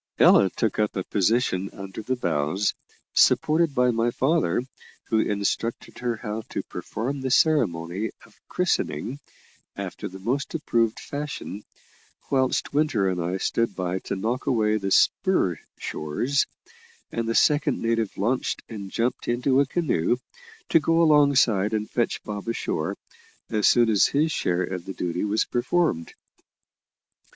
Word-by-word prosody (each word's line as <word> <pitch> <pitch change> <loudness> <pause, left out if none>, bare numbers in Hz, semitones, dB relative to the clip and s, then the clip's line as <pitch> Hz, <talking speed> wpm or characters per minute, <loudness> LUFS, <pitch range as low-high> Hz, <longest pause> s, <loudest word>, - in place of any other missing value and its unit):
Ella 95 - +6
took 110 +3 -2
up 105 -1 +1
a 95 - -1
position 100 -1 +1
under 95 +2 -7
the 130 +4 -1
bows, 85 - 0 0.4
supported 155 -1 +3
by 125 -1 +4
my 115 0 +1
father, 130 - +1 0.5
who 110 - +3
instructed 105 +2 -2
her 120 -1 -1
how 110 -1 -4
to - - -3
perform 130 +5 -4
the 130 - -2
ceremony 105 - +2 0.2
of - - -22
christening 175 -6 -1 0.6
after - - -5
the 95 - -9
most 125 - -2
approved 115 -8 0
fashion, 140 -8 -6 0.7
whilst 130 -1 +1
Winter 140 -10 +2
and 90 -1 -2
I 90 +3 -1
stood 115 +4 0
by 90 0 -2
to - - -2
knock 115 +6 -2
away 110 -3 +2
the 100 -2 -3
spur 95 - +2 0.2
shores, 120 - -1 0.6
and 115 0 -2
the 115 - 0
second 145 -2 +3
native 115 -2 -1
launched 120 +6 -1
and 100 -4 -7
jumped 120 +5 -2
into 125 +3 +2
a 140 - +3
canoe, 130 - +1 0.5
to 165 - +5
go 165 +2 +2
alongside 135 -9 +4
and 105 0 -2
fetch 120 -2 -1
Bob 105 0 -6
ashore, 115 - -2 0.5
as 105 -1 +3
soon 120 -1 +5
as 105 -3 +4
his 155 +3 +1
share 90 -9 0
of 90 -1 -5
the 95 - -5
duty 90 -1 -2
was 105 +1 +1
performed. 125 - 0
115 Hz, 145 wpm, -25 LUFS, 95-135 Hz, 0.7 s, Ella